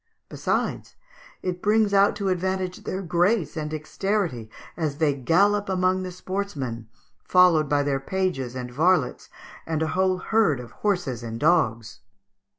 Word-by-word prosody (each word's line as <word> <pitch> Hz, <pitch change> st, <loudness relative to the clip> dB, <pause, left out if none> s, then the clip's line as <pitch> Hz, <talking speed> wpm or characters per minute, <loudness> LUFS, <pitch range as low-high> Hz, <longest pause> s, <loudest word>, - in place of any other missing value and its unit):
Besides, -, -, -2 dB, 0.5 s
it 180 Hz, -1 st, -3 dB
brings 210 Hz, 0 st, +2 dB
out 200 Hz, +1 st, +4 dB
to 200 Hz, -2 st, -2 dB
advantage 185 Hz, 0 st, -2 dB
their 190 Hz, +1 st, -3 dB
grace 175 Hz, +2 st, +1 dB
and 155 Hz, -2 st, -3 dB
dexterity 155 Hz, -, -2 dB, 0.3 s
as 155 Hz, -4 st, -2 dB
they 155 Hz, -2 st, +2 dB
gallop 195 Hz, +9 st, +2 dB
amongst 185 Hz, 0 st, +1 dB
the 185 Hz, -, -5 dB
sportsmen, 165 Hz, -, -4 dB, 0.4 s
followed 175 Hz, -5 st, +4 dB
by 145 Hz, 0 st, +2 dB
their 140 Hz, -1 st, 0 dB
pages 135 Hz, -6 st, -2 dB
and 125 Hz, -1 st, -5 dB
varlets 155 Hz, 0 st, +1 dB, 0.4 s
and 160 Hz, -1 st, -1 dB
a 160 Hz, -, -1 dB
whole 185 Hz, +1 st, +1 dB
herd 200 Hz, -, +1 dB
of 120 Hz, -1 st, -9 dB
horses 175 Hz, -, -2 dB
and 115 Hz, -1 st, -6 dB
dogs." 115 Hz, -9 st, +1 dB
175 Hz, 145 wpm, -24 LUFS, 140-190 Hz, 0.5 s, out